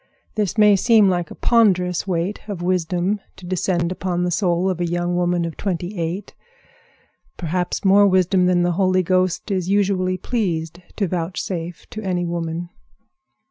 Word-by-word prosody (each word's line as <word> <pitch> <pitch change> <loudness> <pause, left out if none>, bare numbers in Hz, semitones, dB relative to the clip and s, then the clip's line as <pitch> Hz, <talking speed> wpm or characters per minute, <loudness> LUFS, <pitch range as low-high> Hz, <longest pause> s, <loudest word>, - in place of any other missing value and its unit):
This 210 0 -1
may 210 -1 +6
seem 215 0 +4
like 175 -2 -1
a - - -9
ponderous 185 -7 +2
weight 180 +2 -1
of 195 -5 -5
wisdom 180 +2 0 0.2
to 185 - -12
descend 175 -1 -1
upon 180 -1 -2
the 180 - 0
soul 175 0 +1
of 185 -2 -1
a 175 - 0
young 175 0 -1
woman 175 -1 +1
of 165 - -5
twenty 185 0 -3
eight—perhaps 195 - -6
more 200 +1 +6
wisdom 185 -1 +3
than 180 -1 +3
the 175 - +2
Holy 185 -1 +3
Ghost 185 +2 0
is 185 -2 -1
usually 190 -2 +1
pleased 175 -7 -2 0.2
to 200 - 0
vouchsafe 175 0 -4
to 215 - -6
any 180 -3 -1
woman. 170 0 -3
180 Hz, 155 wpm, -21 LUFS, 175-195 Hz, 0.2 s, may